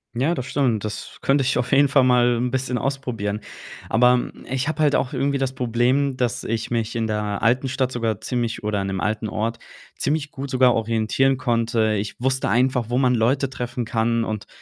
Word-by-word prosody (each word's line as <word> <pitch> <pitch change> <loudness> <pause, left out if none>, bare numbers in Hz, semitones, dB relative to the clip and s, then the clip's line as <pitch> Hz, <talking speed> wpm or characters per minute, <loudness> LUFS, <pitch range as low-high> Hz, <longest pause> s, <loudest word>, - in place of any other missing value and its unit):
Ja, 140 +8 +1
das 130 -4 -4
stimmt. 125 -8 0
Das 105 - -6
könnte 135 0 +2
ich 130 - +1
auf 125 - -2
jeden 140 +1 +5
Fall 135 -1 +4
mal 125 -1 +4
'n 125 +1 0
bisschen 130 -1 -1
ausprobieren. 115 -7 -3 0.5
Aber 125 +2 +3 0.2
ich 135 +2 -1
habe 155 0 -2
halt 145 -1 +3
auch 130 - 0
irgendwie 140 +2 0
das 135 -1 -1
Problem, 125 +3 +1
dass 125 -2 -1
ich 115 +1 -3
mich 115 -1 -1
in 115 -1 0
der 105 -1 -2
alten 125 +3 +2
Stadt 130 -1 -1
sogar 115 -4 -2
ziemlich 120 -3 -3
oder 105 -2 -1
in 95 - -3
dem 95 -1 -3
alten 110 +1 -1
Ort 115 +2 -2 0.4
ziemlich 150 0 -1
gut 135 0 -6
sogar 125 -1 +4
orientieren 115 +4 +1
konnte. 115 -3 +1
Ich 105 +2 -3
wusste 130 -1 0
einfach, 125 +1 +2
wo 120 - 0
man 130 -2 +3
Leute 130 +4 +1
treffen 120 -1 -4
kann 115 0 0
und 110 -2 -4
125 Hz, 200 wpm, -22 LUFS, 115-130 Hz, 0.5 s, jeden